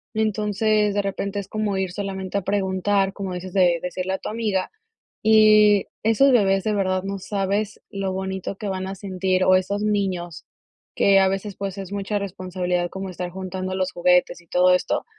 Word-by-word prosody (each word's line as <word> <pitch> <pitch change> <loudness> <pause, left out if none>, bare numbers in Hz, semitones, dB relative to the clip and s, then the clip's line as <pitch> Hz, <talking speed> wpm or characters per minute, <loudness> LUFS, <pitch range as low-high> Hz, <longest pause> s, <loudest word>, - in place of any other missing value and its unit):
Entonces, 215 -1 +1
de 205 - +1
repente 200 0 -3
es 195 - -6
como 215 -1 -2
ir 190 -1 -1
solamente 190 0 -4
a - - 0
preguntar, 195 0 0
como 195 -3 -5
dices 180 +1 -6
de 180 -3 +3
decirle 185 +1 -3
a 190 - -1
tu - - -7
amiga, 210 -4 -1 0.6
y 215 -2 +6 0.2
esos 225 +5 +4
bebés, 195 -5 +3
de 215 - +1
verdad 185 -2 0
no 195 +1 -4
sabes 200 +2 -2
lo 195 -1 -3
bonito 190 0 -4
que 210 -1 -5
van 190 0 -3
a 195 - -5
sentir, 185 -1 -1
o 185 - +5
esos 200 +2 -1
niños, 190 -5 -2 0.5
que 195 -1 +4
a 190 - +4
veces, 195 +1 -3
pues, 195 -1 -4
es 195 -2 -6
mucha 205 +1 -2
responsabilidad 180 -2 -2
como 190 0 -6
estar 180 0 -5
juntando 185 0 -5
los 185 0 -1
juguetes, 180 0 +2
y 175 - -23
todo 180 +2 +4
esto, 180 - 0
195 Hz, 185 wpm, -23 LUFS, 185-205 Hz, 0.6 s, y